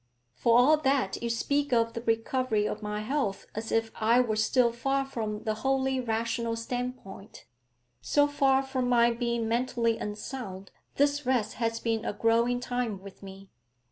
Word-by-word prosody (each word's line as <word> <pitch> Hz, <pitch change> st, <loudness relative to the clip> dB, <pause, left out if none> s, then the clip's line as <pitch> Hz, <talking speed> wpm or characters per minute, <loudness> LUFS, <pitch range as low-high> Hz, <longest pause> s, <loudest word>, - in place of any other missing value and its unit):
'For 230 Hz, -, +3 dB
all 285 Hz, +6 st, +6 dB
that, 270 Hz, -9 st, 0 dB
you 235 Hz, -, -2 dB
speak 285 Hz, +5 st, 0 dB
of 230 Hz, -1 st, +2 dB
the 230 Hz, -, -4 dB
recovery 225 Hz, -1 st, 0 dB
of 210 Hz, -, -4 dB
my 210 Hz, 0 st, -3 dB
health 235 Hz, -4 st, -2 dB
as 220 Hz, +1 st, -5 dB
if 225 Hz, 0 st, +1 dB
I 230 Hz, +2 st, +3 dB
were 235 Hz, -4 st, +1 dB
still 235 Hz, +3 st, +3 dB
far 270 Hz, +3 st, -1 dB
from 215 Hz, -5 st, -4 dB
the 215 Hz, -, 0 dB
wholly 265 Hz, +3 st, 0 dB
rational 230 Hz, -1 st, -1 dB
stand 245 Hz, +2 st, -3 dB
point. 195 Hz, -1 st, -12 dB, 0.6 s
So 290 Hz, 0 st, +3 dB
far 275 Hz, -2 st, +2 dB
from 260 Hz, -2 st, -2 dB
my 235 Hz, -1 st, +4 dB
being 235 Hz, -1 st, -1 dB
mentally 235 Hz, -1 st, 0 dB
unsound, 210 Hz, -2 st, -6 dB, 0.2 s
this 285 Hz, -1 st, +1 dB
rest 235 Hz, -5 st, +1 dB
has 230 Hz, 0 st, 0 dB
been 225 Hz, -2 st, -1 dB
a 235 Hz, -, -2 dB
growing 230 Hz, +3 st, +2 dB
time 245 Hz, -6 st, -3 dB
with 195 Hz, -1 st, -12 dB
me. 195 Hz, 0 st, -11 dB
235 Hz, 170 wpm, -28 LUFS, 220-255 Hz, 0.6 s, all